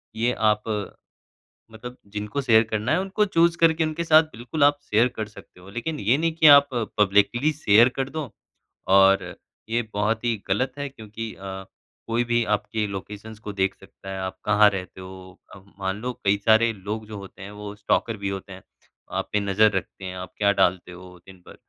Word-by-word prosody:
ये 120 Hz, +2 st, 0 dB
आप 105 Hz, -1 st, +1 dB, 1.1 s
मतलब 125 Hz, +3 st, -10 dB, 0.2 s
जिनको 105 Hz, +7 st, -3 dB
शेयर 110 Hz, -3 st, +5 dB
करना 110 Hz, +2 st, -1 dB
है, 180 Hz, -, +2 dB
उनको 195 Hz, +2 st, 0 dB
चूज़ 170 Hz, -3 st, +2 dB
करके 165 Hz, -1 st, +3 dB
उनके 155 Hz, +2 st, -3 dB
साथ 160 Hz, 0 st, +6 dB
बिल्कुल 120 Hz, +6 st, -1 dB
आप 145 Hz, 0 st, +4 dB
शेयर 115 Hz, +4 st, +4 dB
कर 110 Hz, -3 st, -6 dB
सकते 100 Hz, -3 st, -16 dB
हो। 95 Hz, -, -15 dB
लेकिन 115 Hz, +7 st, -4 dB
ये 115 Hz, +7 st, +3 dB
नहीं 165 Hz, 0 st, 0 dB
कि 160 Hz, -, +4 dB
आप 140 Hz, -1 st, +8 dB, 0.3 s
पब्लिकली 105 Hz, +9 st, +3 dB
शेयर 120 Hz, -5 st, +5 dB
कर 135 Hz, 0 st, -1 dB
दो। 155 Hz, -7 st, -5 dB, 0.7 s
और 95 Hz, 0 st, +5 dB, 0.4 s
ये 120 Hz, +1 st, 0 dB
बहुत 110 Hz, +3 st, 0 dB
ही 115 Hz, -2 st, +1 dB
ग़लत 125 Hz, +7 st, 0 dB
है 145 Hz, 0 st, -3 dB
क्योंकि 110 Hz, -2 st, -8 dB
अ, 95 Hz, 0 st, -8 dB, 0.4 s
कोई 120 Hz, +1 st, +1 dB
भी 120 Hz, 0 st, +1 dB
आपके 105 Hz, +1 st, -2 dB
लोकेशंस 105 Hz, +2 st, -8 dB
को 105 Hz, -, -7 dB
देख 95 Hz, 0 st, 0 dB
सकता 95 Hz, 0 st, -12 dB
है। 95 Hz, -, -5 dB
आप 95 Hz, 0 st, -5 dB
कहाँ 105 Hz, 0 st, +5 dB
रहते 95 Hz, -1 st, -7 dB
हो 95 Hz, 0 st, -12 dB
अब 100 Hz, 0 st, -17 dB
मान 95 Hz, +2 st, -3 dB
लो 125 Hz, 0 st, -2 dB
कई 100 Hz, +1 st, +3 dB
सारे 115 Hz, +1 st, +5 dB
लोग 105 Hz, +2 st, -6 dB
जो 105 Hz, -1 st, -8 dB
होते 100 Hz, 0 st, -12 dB
हैं, 100 Hz, -, -8 dB
वो 105 Hz, 0 st, -8 dB
स्टॉकर 110 Hz, +2 st, 0 dB
भी 100 Hz, -1 st, -4 dB
होते 95 Hz, 0 st, -6 dB
हैं। 95 Hz, -, -11 dB, 0.5 s
आप -, -, -3 dB
पे 105 Hz, -, +2 dB
नज़र 100 Hz, +2 st, +3 dB
रखते 95 Hz, 0 st, -5 dB
हैं, 95 Hz, 0 st, -6 dB
आप 90 Hz, 0 st, -8 dB
क्या 100 Hz, -1 st, +3 dB
डालते 90 Hz, -1 st, +1 dB
हो 90 Hz, 0 st, -13 dB
दिन 95 Hz, -1 st, -15 dB
भर। -, -, -12 dB
105 Hz, 200 wpm, -24 LUFS, 100-125 Hz, 1.1 s, आप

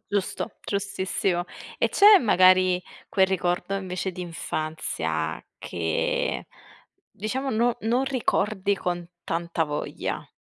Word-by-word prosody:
Giusto. 200 Hz, +2 st, -1 dB, 0.2 s
Giustissimo. 190 Hz, -3 st, -1 dB, 0.3 s
E -, -, +3 dB
c'è 410 Hz, 0 st, +8 dB
magari 185 Hz, -, +5 dB, 0.3 s
quel 190 Hz, -1 st, +4 dB
ricordo 180 Hz, 0 st, -1 dB
invece 185 Hz, -1 st, -3 dB
di 180 Hz, -, -8 dB
infanzia 155 Hz, -, -3 dB, 0.2 s
che 80 Hz, -2 st, -1 dB, 0.6 s
diciamo 260 Hz, +7 st, -3 dB
non 235 Hz, +1 st, +2 dB
non 240 Hz, +4 st, +1 dB
ricordi 215 Hz, -6 st, 0 dB
con 175 Hz, -2 st, -3 dB, 0.2 s
tanta 170 Hz, 0 st, -1 dB
voglia? 150 Hz, -1 st, -4 dB
185 Hz, 105 wpm, -25 LUFS, 175-210 Hz, 0.6 s, c'è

